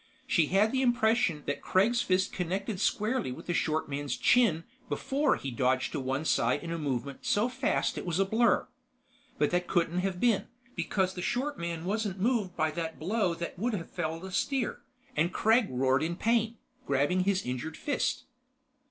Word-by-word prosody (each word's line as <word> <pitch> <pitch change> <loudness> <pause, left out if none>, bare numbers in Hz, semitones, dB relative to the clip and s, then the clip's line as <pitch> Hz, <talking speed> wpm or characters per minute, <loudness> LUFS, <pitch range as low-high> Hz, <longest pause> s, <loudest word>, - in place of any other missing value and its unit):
She 170 - +3
had 200 +5 +3
the 265 - +1
impression 220 - +2
that 145 - -2
Kregg's 230 +6 +2
fist 185 -3 +1
connected 190 +3 -2
squarely 215 - 0
with - - -8
the 175 - -1
short 155 -1 0
man's 145 0 -3
chin 205 -10 +4 0.3
before 275 +1 +1
he 135 - -5
dodged 130 +2 +1
to 150 - -2
one 135 +3 -2
side - - +2
in 165 - -5
a 170 - -2
movement 140 -2 -3
so 210 +3 +2
fast 255 +1 0
it - - -7
was 170 -1 0
a 195 - +3
blur. 225 +4 +2 0.7
But 150 - +2
that 180 0 0
couldn't 175 -1 +1
have 185 -1 -2
been, 225 -2 +2 0.3
because 190 -2 0
the 180 - -5
short 250 +4 -1
man 170 -1 -4
wasn't 205 -1 -2
moved 210 -4 0
by 155 0 +1
that 165 0 -4
blow 190 +1 0
that 170 +1 -6
would 235 +3 0
have 170 -4 -6
felled 165 0 -3
a 190 - -7
steer, 265 +4 -1 0.3
and 170 +3 +2
Kregg 225 +3 +3
roared 130 +1 +2
in 165 +2 -1
pain, 230 +2 +1 0.3
grabbing 145 +7 +2
his 190 0 +1
injured 130 +5 -4
fist. 290 - -1
185 Hz, 185 wpm, -30 LUFS, 160-220 Hz, 0.7 s, chin